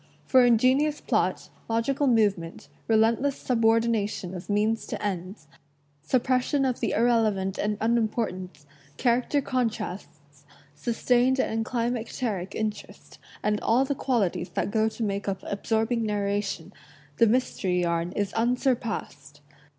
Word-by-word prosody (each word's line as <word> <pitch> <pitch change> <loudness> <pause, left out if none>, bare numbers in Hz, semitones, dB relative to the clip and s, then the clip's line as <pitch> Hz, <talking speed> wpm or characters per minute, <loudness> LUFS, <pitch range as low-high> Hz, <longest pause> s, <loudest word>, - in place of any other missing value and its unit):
For 260 -1 +5
ingenious 255 +6 +3
plot, - - -1 0.2
log 230 0 +1
ical 275 +1 +1
movement, 200 -7 0 0.2
relentless 230 +5 +2
subordination 225 -5 +1
of 180 +2 -8
means 215 +2 +1
to - - -4
ends, 185 -2 -4 0.6
suppression 255 - +1
of 255 -2 -1
the - - -1
irrelevant 215 -5 +1
and 210 0 0
unimportant, 215 -8 -1 0.3
character 250 +3 +1
contrasts, 180 - -4 0.3
sustained 245 - +1
and 225 -3 0
climacteric 230 -5 -3
interest, 215 -1 -5 0.2
and 210 0 0
all 250 +4 +3
the 280 - -1
qualities 220 -10 -1
that - - -1
go 220 0 +2
to 225 - -5
make 200 -1 -2
up 195 -1 -3
absorbing 225 +3 -1
narration, 200 -4 -2 0.4
the 230 - +5
mys 250 +4 +1
tery 180 -2 +1
yarn 170 0 -1
is 205 -1 -2
unsurpassed. 225 - -2
220 Hz, 125 wpm, -26 LUFS, 195-245 Hz, 0.6 s, For